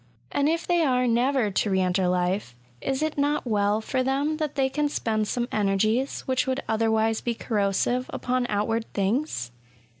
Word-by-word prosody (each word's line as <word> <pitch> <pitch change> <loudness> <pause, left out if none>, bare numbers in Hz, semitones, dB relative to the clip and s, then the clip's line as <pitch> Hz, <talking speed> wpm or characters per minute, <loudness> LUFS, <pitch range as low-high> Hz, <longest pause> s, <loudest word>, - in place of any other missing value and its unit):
And 285 +1 +2
if 330 +1 -1
they 350 -1 +2
are 255 -4 +2
never 240 -1 +2
to 205 - 0
re 190 -1 +2
enter 185 0 +1
life, 180 -6 0 0.3
is 270 +2 -1
it 310 -2 -2
not 290 0 +1
well 210 -1 +1
for 255 +4 -1
them 280 +4 0
that 305 -3 -3
they 270 -1 +2
can 295 +2 0
spend 220 -6 -1
some 240 +1 -1
energies, 215 +6 +1
which 260 0 0
would 260 +1 -1
other 225 0 +1
wise 220 0 +1
be 235 -1 -2
corrosive, 220 +4 0
upon 250 0 -1
outward 225 +2 -1
things 200 - -1
235 Hz, 180 wpm, -25 LUFS, 210-270 Hz, 0.3 s, And